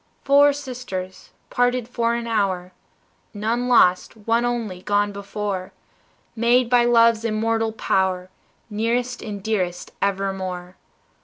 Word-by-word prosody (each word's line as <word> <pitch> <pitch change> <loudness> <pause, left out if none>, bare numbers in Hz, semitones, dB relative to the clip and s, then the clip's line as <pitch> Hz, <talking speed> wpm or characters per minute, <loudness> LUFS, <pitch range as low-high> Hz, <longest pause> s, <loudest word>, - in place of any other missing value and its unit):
Four 285 +1 +6
sisters, 250 -10 -7 0.2
parted 245 -1 +1
for 235 -1 0
an 235 0 -3
hour, 195 -5 -1 0.6
None 230 +4 -1
lost, 205 -4 +3
one 230 +2 0
only 225 -7 -3
gone 205 +1 +1
before, 200 -1 -5 0.6
Made 240 +1 +2
by 240 -1 +5
love's 230 -1 +4
immortal 225 0 0
power, 190 -3 -1 0.4
Nearest 235 +3 -1
and 205 -3 -6
dearest 185 -5 -2
evermore. 190 -2 -2
220 Hz, 110 wpm, -22 LUFS, 195-240 Hz, 0.6 s, Four